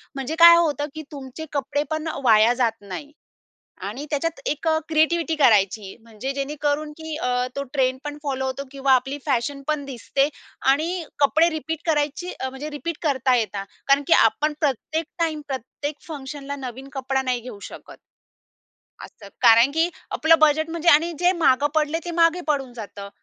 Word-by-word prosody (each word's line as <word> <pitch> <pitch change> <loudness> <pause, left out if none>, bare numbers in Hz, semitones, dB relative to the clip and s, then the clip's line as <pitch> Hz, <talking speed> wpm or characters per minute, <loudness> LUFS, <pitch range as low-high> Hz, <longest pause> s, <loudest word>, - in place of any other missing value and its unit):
म्हणजे 270 +4 -3
काय 340 0 +10
होतं, 295 -3 +1
की 315 - -5
तुमचे 280 +2 -8
कपडे 290 +1 -1
पण 315 +1 -2 0.2
वाया 225 0 +5
जात 240 -2 +1
नाही 205 +9 -8 0.8
आणि 250 +8 -6
त्याच्यात 330 - -2
एक 305 +2 -2
अ, 315 0 +3
क्रिएटिव्हिटी 325 +1 +2
करायची. 205 -6 +2
म्हणजे 230 +4 -6
जेणेकरून, 290 +2 -2
की 320 -1 -6
अ, 250 -2 0
तो 280 - -1
ट्रेंड 260 -2 +1
पण 295 0 -5
फॉलो 265 -2 -2
होतो 265 +1 -4
किंवा 275 -1 +1
आपली 270 +3 -1
फॅशन 275 +1 -1
पण 300 -2 0
दिसते 275 +1 -1 0.4
आणि 335 +5 -1
अ, 315 - -12 0.2
कपडे 315 +4 +4
रिपीट 320 0 -4
करायची, 300 +3 -1
अ, 260 - -2
म्हणजे 265 +4 -7
रिपीट 335 +1 -4
करता 265 -4 +2
येतात 205 -3 -2 0.2
कारण 275 +1 +5
की - - 0
आपण 300 +8 0
प्रत्येक 310 +3 -1
टाईम, 320 -2 0
प्रत्येक 275 +3 -5
फंक्शनला 285 -1 -6
नवीन 265 0 -8
कपडा 265 0 -1
नाही 250 -2 -1
घेऊ 235 -3 -9
शकत. - - -12 1.1
असतं, 205 - -12
कारण 235 +2 +6
की 325 +3 +1 0.2
आपलं 325 +1 +4
बजेट, 310 +1 +3
म्हणजे 335 +1 +1
आणि 330 +4 +5
जे 355 0 +4
मागे 265 +3 +4
पडलंय 310 +1 +1
ते 345 - -3
मागे 335 +2 +4
पडून 275 -4 -1
जातं. 200 -3 -8
285 Hz, 170 wpm, -23 LUFS, 255-315 Hz, 1.1 s, काय